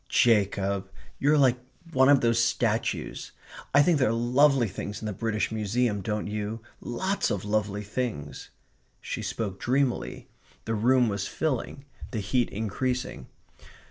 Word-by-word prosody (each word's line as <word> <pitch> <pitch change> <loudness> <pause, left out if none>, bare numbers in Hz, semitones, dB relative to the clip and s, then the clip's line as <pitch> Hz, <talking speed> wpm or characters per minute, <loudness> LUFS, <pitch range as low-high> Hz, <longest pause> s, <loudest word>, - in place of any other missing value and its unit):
"Jacob. 100 -3 +2 0.3
You're 150 +2 +4
like 130 -3 +4 0.3
one 130 0 +5
of 145 -2 +6
those 115 0 +3
statues.... 115 -1 -1 0.4
I 145 +1 +6
think 170 -3 +3
there 130 - +3
are - - +1
lovely 125 +2 +3
things 100 +2 -6
in - - -7
the 105 - -2
British 110 +2 -1
Museum, 110 0 0
don't 105 +2 -2
you? 105 +2 -4 0.2
Lots 190 +11 -1
of 100 -1 -2
lovely 105 -1 -1
things 105 - -4 0.3
..." - - -41
she - - -5
spoke 100 -4 -4
dreamily. 130 0 -1 0.4
The 115 - -1
room 125 +3 +3
was 100 -2 -2
filling; 140 -2 -3 0.2
the 110 - -3
heat 115 +5 0
increasing. 110 - -3
115 Hz, 145 wpm, -27 LUFS, 105-130 Hz, 0.4 s, of